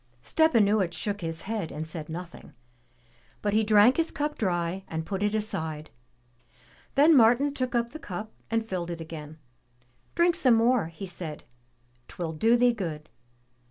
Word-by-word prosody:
Stepanuich 215 - +3
shook 200 +5 -3
his 165 -1 -4
head 210 -5 -3
and 155 +1 -5
said 155 -1 -5
nothing, 175 +2 -8 0.9
but 205 -1 0
he 220 +1 +3
drank 215 +4 +5
his 330 0 +1
cup 295 0 -3
dry 180 -2 -1
and 160 0 -4
put 195 +2 -4
it 210 +1 +1
aside. 160 -8 -3 1.0
Then 300 +3 +6
Martin 250 +4 +5
took 255 -3 -2
up 235 0 0
the 310 - -8
cup 210 - -6 0.2
and 225 0 0
filled 180 -5 -4
it 170 -1 -5
again. 155 -1 -8 0.8
''Drink 345 0 +3
some 255 -8 +4
more," 230 -4 +3
he 165 +4 -8
said, 170 -4 -6 0.6
"Twill 170 -2 -5
do 225 +9 +3
thee 245 0 +4
good. 160 -8 -5
205 Hz, 160 wpm, -27 LUFS, 165-235 Hz, 1.0 s, Then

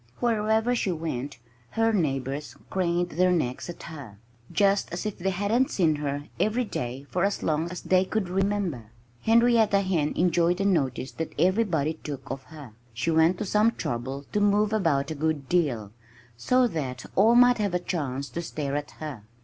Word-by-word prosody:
Wherever 220 0 +2
she 220 -6 0
went 145 -5 -4 0.4
her 225 0 +3
neighbors 140 - -1 0.2
craned 175 -1 0
their 180 +3 +3
necks 155 -4 -1
at 175 - -8
her, 140 -11 -9 0.3
just 200 -1 +2
as 175 +5 -4
if 210 -2 -4
they 190 +2 0
hadn't 205 +7 +1
seen 160 -5 +2
her 145 -1 -3 0.2
every 235 +4 +1
day 130 - -5
for 180 - 0
as 200 0 0
long 160 +2 0
as 180 - -6
they 185 0 +3
could 210 0 -1
remember. 190 - -1 0.4
Henrietta 225 -3 +4
Hen 175 -6 0
enjoyed 175 0 +2
the 195 - -1
notice 140 -8 0
that 160 - -5
everybody 165 -4 +1
took 140 -2 -6
of 135 0 -4
her. 145 -7 -11 0.2
She 125 +8 0
went 160 +3 +4
to 215 - -3
some 210 +4 +3
trouble 130 +4 -4
to 210 - +1
move 205 +1 +3
about 160 -9 +1
a - - -1
good 155 -2 -2
deal, 125 - 0 0.4
so 250 - +3
that 135 - -4
all 220 +5 +5
might 245 -1 +6
have 200 -4 0
a - - +2
chance 140 -6 -3
to 170 +8 -4
stare 145 -4 -3
at 145 0 -3
her. 150 -8 -6
170 Hz, 180 wpm, -26 LUFS, 145-205 Hz, 0.4 s, might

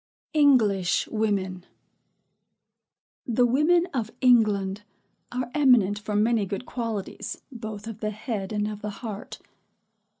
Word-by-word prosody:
ENGLISH 225 - +3
WOMEN. 195 -4 -1 1.6
The 245 +1 +3
women 305 +8 +3
of 230 -5 -1
England 210 -6 +3 0.5
are 245 0 -3
eminent 245 -9 +4
for 210 0 -4
many 215 -1 +2
good 200 +6 -4
qualities 230 -5 -4
both 220 -4 -7
of 225 -2 -7
the 215 - -2
head 215 -2 -4
and 210 -1 0
of 210 -1 -6
the 210 - -3 0.2
heart. 210 -1 -6
215 Hz, 120 wpm, -26 LUFS, 205-245 Hz, 1.6 s, eminent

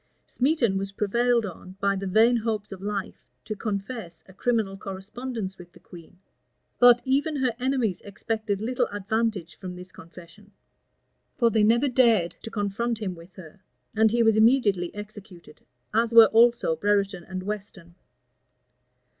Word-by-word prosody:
Smeton 250 -8 +1
was 195 0 -5
prevailed 235 +3 +1
on, 185 0 -9
by 200 0 +1
the 195 0 -4
vain 225 +5 +4
hopes 215 -3 -3
of 190 -1 -8
life, 205 +1 -5 0.2
to 215 - -4
confess 200 -3 -5
a 190 - -15
criminal 220 -2 -1
correspondence 195 +2 -6
with 175 0 -13
the - - -17
queen;[] 175 0 -15 0.6
but 245 0 +6
even 280 +4 0
her 260 -4 0
enemies 250 -7 -1
expected 210 0 -3
little 245 +3 0
advantage 205 -3 -3
from 180 -2 -7
this 180 +1 -11
confession; 175 +5 -15 0.8
for 235 -3 +2
they 220 -1 +2
never 235 +6 +3
dared 235 -9 +3
to - - -7
confront 225 +2 -2
him 195 -4 -3
with 170 +2 -15
her; 180 0 -13 0.4
and 220 0 +4
he 235 +2 +2
was 225 -1 +4
immediately 215 -6 +3
executed; 205 -6 -11 0.3
as 230 +1 +1
were 230 -2 +8
also 235 -7 +4
Brereton 200 0 0
and 185 +1 -6
Weston. 195 -4 -7
210 Hz, 150 wpm, -25 LUFS, 190-235 Hz, 0.8 s, were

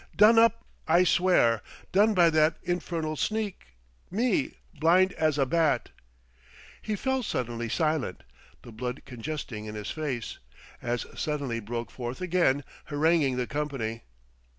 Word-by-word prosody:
"Done 220 +2 +7
up, 230 0 +3 0.2
I 170 +3 +5
swear! 175 - +3 0.3
Done 210 +3 +4
by 170 -2 +5
that 155 0 +3
infernal 170 -3 -2
sneak 205 - -3 0.3
me, 255 - 0 0.2
blind 180 +4 +4
as 155 -2 +1
a 135 - +3
bat!" 160 +2 +1 0.9
He 215 - -2
fell 265 +5 0
suddenly 120 - -3
silent, 155 - -1 0.4
the 120 - -11
blood 125 +4 -5
congesting 125 -3 -6
in 105 0 -7
his 105 0 -5
face; 140 -7 -4 0.4
as 120 0 -2
suddenly 140 -6 -2
broke 115 +2 -5
forth 120 0 -5
again, 175 -6 +2 0.2
haranguing 150 -3 +2
the 125 - 0
company. 135 -6 -3
155 Hz, 130 wpm, -28 LUFS, 120-180 Hz, 0.9 s, Done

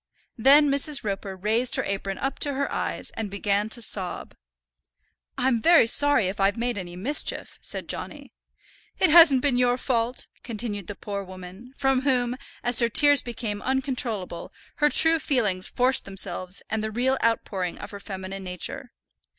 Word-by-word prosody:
Then 280 +4 +5
Mrs. 280 +1 +2
Roper 195 -1 -5
raised 220 +6 0
her - - 0
apron 195 0 -4
up 270 - -4
to 285 - -1
her 280 +1 -3
eyes, - - -4
and 220 -2 -5
began 200 +1 -1
to 235 +1 -3
sob. 190 -4 -2 1.0
"I'm 250 -3 +1
very 335 0 +5
sorry 270 -3 +4
if 195 +2 -5
I've 195 +2 +1
made 240 +1 -2
any 175 -3 -7
mischief," 250 +12 0
said - - -3
Johnny. - - -6 0.6
"It 370 - +2
hasn't 305 -6 +7
been 275 -4 +1
your 245 0 +2
fault," 245 -1 -1 0.2
continued 215 -4 -4
the 205 - -6
poor 200 0 -6
woman, 185 +7 -12
from 270 -2 +1
whom, 250 -3 0 0.3
as 245 -1 +5
her 235 -1 +3
tears 290 +3 +6
became 225 -4 -5
uncontrollable, 250 -9 -2 0.3
her 295 -1 +3
true 325 +2 +5
feelings 210 -11 -1
forced 255 +1 +1
themselves 190 -1 -3
and 220 0 -3
the 220 - -2
real 255 +4 -1
outpouring 195 -6 -2
of 205 - -9
her 200 - -9
feminine 195 -1 -7
nature. 180 -2 -5
230 Hz, 165 wpm, -24 LUFS, 195-265 Hz, 1.0 s, hasn't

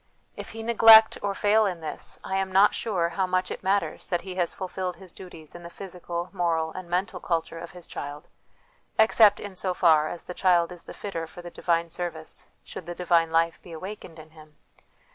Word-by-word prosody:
If - - -8
he 225 0 -7
neglect 225 -1 +7
or 200 -1 -2
fail 210 +1 +3
in 180 -3 -4
this, 155 -2 -6
I 190 - -3
am 190 0 -1
not 195 +2 +5
sure 180 -7 -1
how 185 +2 -1
much 185 0 0
it - - -6
matters 195 +1 -1
that 175 -2 -1
he 190 - -6
has 180 -2 0
fulfilled 185 -1 -4
his 185 0 -12
duties 165 -5 -11
in 175 - -10
the 170 - -9
physical, 175 -1 -6
moral, 165 -3 0
and 185 +1 -9
mental 185 +2 -1
culture 165 -1 -2
of 170 0 -8
his 180 -1 -10
child, 145 +1 -7 0.7
except 220 -1 +5
in 200 -2 -8
so 185 0 -2
far 155 -4 +4
as 175 - -7
the 180 - -7
child 180 -2 +2
is 175 -1 -10
the - - -10
fitter 165 -5 -5
for 175 +2 -12
the 175 - -8
divine 170 -1 -1
service 165 -3 -6 0.2
should - - -9
the 175 - -5
divine 170 -2 +2
life 165 0 +1
be 170 - -12
awakened 180 -1 -8
in 155 0 -13
him. 155 -1 -17
175 Hz, 210 wpm, -26 LUFS, 165-190 Hz, 0.7 s, neglect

